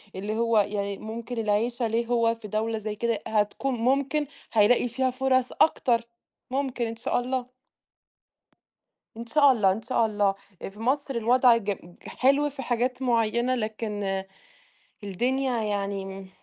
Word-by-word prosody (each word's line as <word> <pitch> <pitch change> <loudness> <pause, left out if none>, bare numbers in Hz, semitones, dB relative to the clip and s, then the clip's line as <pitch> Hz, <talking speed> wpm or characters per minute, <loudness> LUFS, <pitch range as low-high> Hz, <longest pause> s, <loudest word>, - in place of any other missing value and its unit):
اللي 205 +3 -3
هو 230 -1 +2
يعني 200 -1 -1
ممكن 230 +2 -6
العيشة 225 +3 0
ليه 230 +1 0
هو 230 -1 +2
في 225 -2 -10
دولة 220 +2 -1
زي 215 0 -4
كده، 230 -1 -1
هتكون 220 +5 0
ممكن 275 +5 +1 0.3
هيلاقي 230 +3 +4
فيها 260 +2 0
فرص 260 -1 +1
أكتر، 235 -6 +3 0.5
ممكن 260 -3 -1
إن 225 - -5
شاء 230 - -1
الله. 250 0 -2 1.7
إن 235 - -6
شاء 285 +3 +5
الله، 205 -6 +3
إن 215 +4 -3
شاء 230 0 +1
الله. 205 -2 +1 0.3
آآ، - - -5
في 205 +2 -16
مصر 270 +2 -1
الوضع 240 +1 +5
ج 205 -2 -2
ج 175 -2 -10
حلو 280 +3 +2
في 275 -1 -8
حاجات 250 +2 -1
معيّنة، 235 +1 +1
لكن، 210 -4 -3 0.8
الدنيا 245 +4 0
يعني 200 -1 -2
امم، 195 0 -8
230 Hz, 150 wpm, -26 LUFS, 210-255 Hz, 1.7 s, شاء